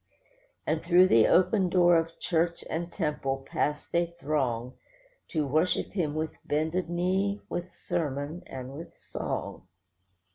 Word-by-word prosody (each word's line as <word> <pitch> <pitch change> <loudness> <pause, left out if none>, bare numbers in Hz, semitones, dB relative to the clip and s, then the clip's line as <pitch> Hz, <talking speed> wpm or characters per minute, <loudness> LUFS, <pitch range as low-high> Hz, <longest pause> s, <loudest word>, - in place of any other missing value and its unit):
And 155 0 0
through 180 +2 +5
the 115 -1 +6
open 185 +1 +4
door 175 -1 +5
of 165 0 0
church 170 0 0
and 170 +2 -3
temple 135 -6 -2
passed 150 0 -2
a 170 0 +3
throng, 130 -5 -1 0.5
To 155 -3 -1
worship 155 +6 +1
Him 160 -7 -1
with 155 0 -1
bended 160 +4 -1
knee, 190 +4 0
with 175 +1 -4
sermon, 145 +2 -3
and 130 0 -7
with 165 +4 -9
song. - - -5
165 Hz, 135 wpm, -28 LUFS, 145-175 Hz, 0.5 s, the